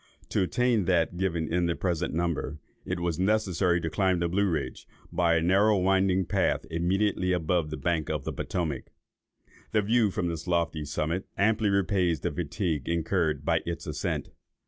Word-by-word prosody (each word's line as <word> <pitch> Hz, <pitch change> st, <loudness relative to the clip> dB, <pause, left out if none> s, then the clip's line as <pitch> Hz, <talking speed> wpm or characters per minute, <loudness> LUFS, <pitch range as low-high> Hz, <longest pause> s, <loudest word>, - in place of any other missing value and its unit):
To -, -, +1 dB
attain 120 Hz, +1 st, +2 dB
that 90 Hz, -1 st, +2 dB
given 85 Hz, -4 st, -1 dB
in 90 Hz, -1 st, +2 dB
the 85 Hz, -, 0 dB
present 85 Hz, -2 st, -1 dB
number, 85 Hz, -2 st, -2 dB, 0.3 s
it 90 Hz, -1 st, -2 dB
was 85 Hz, -1 st, -1 dB
necessary 95 Hz, -3 st, +2 dB
to 80 Hz, -, -2 dB
climb 95 Hz, -1 st, +2 dB
the 85 Hz, 0 st, 0 dB
Blue 100 Hz, +3 st, +1 dB
Ridge, 80 Hz, -, -3 dB, 0.2 s
by 85 Hz, -1 st, +2 dB
a 80 Hz, -, +2 dB
narrow 100 Hz, +4 st, +4 dB
winding 95 Hz, 0 st, +2 dB
path, 95 Hz, +2 st, 0 dB
immediately 90 Hz, +2 st, +1 dB
above 85 Hz, -2 st, 0 dB
the 75 Hz, -, -4 dB
bank 80 Hz, +2 st, -1 dB
of 75 Hz, -3 st, -2 dB
the -, -, -4 dB
Potomac. 80 Hz, -7 st, -3 dB, 0.9 s
The 105 Hz, -1 st, +3 dB
view 110 Hz, +1 st, +3 dB
from 90 Hz, -2 st, -2 dB
this 85 Hz, 0 st, -4 dB
lofty 85 Hz, -3 st, 0 dB
summit 75 Hz, +5 st, -2 dB
amply 105 Hz, +1 st, +2 dB
repays 90 Hz, -4 st, +1 dB
the -, -, -1 dB
fatigue 80 Hz, -2 st, -2 dB
incurred 80 Hz, -3 st, 0 dB
by 80 Hz, 0 st, +2 dB
its 85 Hz, -1 st, -5 dB
ascent. -, -, -3 dB
85 Hz, 170 wpm, -28 LUFS, 80-95 Hz, 0.9 s, narrow